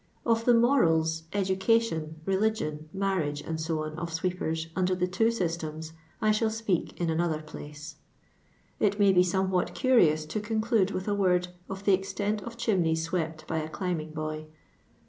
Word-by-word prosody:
Of 230 -1 +2
the 245 - +6
moralif 165 - +3
edHcation, 190 -4 +1
reliffion, 190 -6 0
mamagt, 165 -6 -1
&c., 160 +1 -3
of 155 +2 -3
iweepen, 165 -1 -2
under 185 0 +1
the 180 0 +1
two 185 +5 +1
eyitema, 165 -7 -2 0.3
I 215 - +3
ihall 220 +1 +2
speak 220 -5 -2
in 170 -2 +1
another 160 -1 0
place. 150 0 -9 0.8
It 205 -1 +2
may 200 -1 +5
be 180 - +6
somewhat 180 -1 0
cnrioni 170 -11 +4
to 215 - -2
conclude 220 -1 +1
with 185 -1 -4
a 205 - +1
word 180 -3 +2 0.2
of 195 0 -6
the 200 - +5
extent 205 +2 -1
of 235 +1 -8
chimneya 165 -8 +1
awept 160 -3 -2
by 160 - -1
a 155 0 -4
climbing 170 -3 -3
boy. 155 0 -5
180 Hz, 155 wpm, -28 LUFS, 160-205 Hz, 0.8 s, the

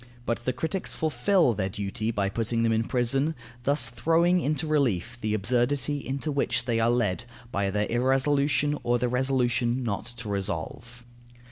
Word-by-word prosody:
But 120 0 -2
the 130 - +2
critics 165 +8 -3
fulfil 160 - +2
their 95 -2 -2
duty 105 +3 -3
by 100 -4 0
putting 115 +3 -1
them 115 - +2
in 110 0 +1
prison, 135 +6 +1 0.3
thus 140 -4 +3
throwing 165 +9 +2
into 150 0 -1
relief 120 - 0
the 110 0 0
absurdity 125 +7 0
into 140 +3 -3
which 140 -4 0
they 115 -3 +1
are 115 +1 +3
led 120 -2 0 0.3
by 100 -2 0
their 105 +2 0
irresolution, 140 +4 +2
or 120 0 +1
their 125 +1 0
resolution 125 -1 +1
not 110 -2 -2
to 120 -1 -7
resolve. 100 +5 -4
120 Hz, 160 wpm, -27 LUFS, 115-140 Hz, 0.3 s, thus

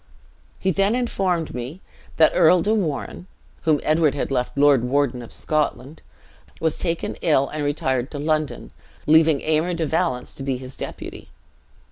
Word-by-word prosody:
He 190 - 0
then 195 +5 +2
informed 190 -9 -1
me 125 +8 -6 0.4
that 160 -1 +6
Earl 175 +2 +5
de 210 - +2
Warenne 180 -2 -3 0.4
(whom 155 -2 +3
Edward 155 -1 +2
had 140 - -3
left 125 0 -1
lord 140 -3 +5
warden 130 -1 0
of 120 - -11
Scotland), 150 -1 -2 0.6
was 160 -1 -1
taken 170 -2 -2
ill, 140 -4 +2
and 150 -1 -4
retired 130 -3 -1
to 145 - -7
London, 155 0 -2 0.3
leaving 160 -1 +4
Aymer 160 +3 0
de 165 -1 -1
Valence 125 -5 -1
to - - -8
be 135 -1 -1
his 130 +1 -9
deputy. - - -8
155 Hz, 155 wpm, -22 LUFS, 135-165 Hz, 0.6 s, that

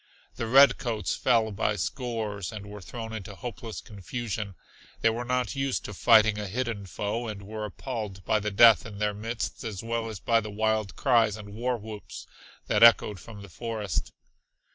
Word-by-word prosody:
The 115 - -4
redcoats 125 -3 +4
fell 110 -2 +2
by 105 +1 0
scores 110 -2 -3
and 105 -2 -7
were 105 0 -9
thrown 115 +4 -7
into 100 -2 -7
hopeless 115 0 -7
confusion. 105 -1 -5 0.5
They 115 - +4
were 120 +2 -3
not 125 +2 -1
used 135 -1 -1
to 105 - -6
fighting 110 +1 +5
a 105 - -3
hidden 110 -2 -3
foe, 105 +6 -3
and 105 -2 -6
were 105 +1 -5
appalled 105 -3 -6
by 110 - +2
the 105 +1 -2
death 110 +2 +7
in 105 -3 -9
their 105 0 0
midst 115 +3 -4
as 110 -4 -5
well 115 0 -2
as 110 -4 -6
by 115 +3 +2
the 110 - -6
wild 110 0 0
cries 115 -5 +3
and 105 -1 -9
war 120 +3 -1
whoops 110 -1 -9 0.4
that - - +1
echoed 115 -4 +6
from 105 +2 -11
the - - -10
forest. 110 -1 -3
110 Hz, 180 wpm, -28 LUFS, 105-115 Hz, 0.5 s, death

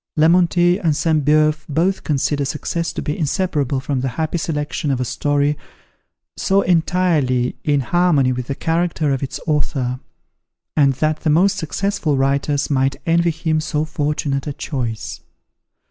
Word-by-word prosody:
Lemontey 175 +3 +4
and 160 -6 +1
Sainte 155 -1 +1
Beuve 155 +1 +3
both 170 +6 0
consider 145 0 0
success 165 +4 -2
to - - -4
be 150 - -2
inseparable 150 -5 -1
from 135 0 -2
the 135 - -1
happy 160 +1 -1
selection 150 -2 -2
of 135 -2 0
a 125 - -1
story 145 +4 0 0.8
so 195 +1 +2
entirely 165 -8 +1
in 145 -2 +2
harmony 150 -3 +2
with 125 0 -5
the 140 - -3
character 165 -1 0
of 135 - -1
the 135 0 -5
author; 135 -5 -1 0.8
and 140 -3 +4
that 155 +3 0
the 160 - -1
most 180 +6 +4
successful 160 -3 -1
writers 140 +1 +1
might 135 -1 +1
envy 170 +1 +3
him 160 -1 -1
so 155 -1 -1
fortunate 145 -2 -2
a 145 - -3
choice. 120 -7 -4
150 Hz, 150 wpm, -19 LUFS, 140-165 Hz, 0.8 s, Lemontey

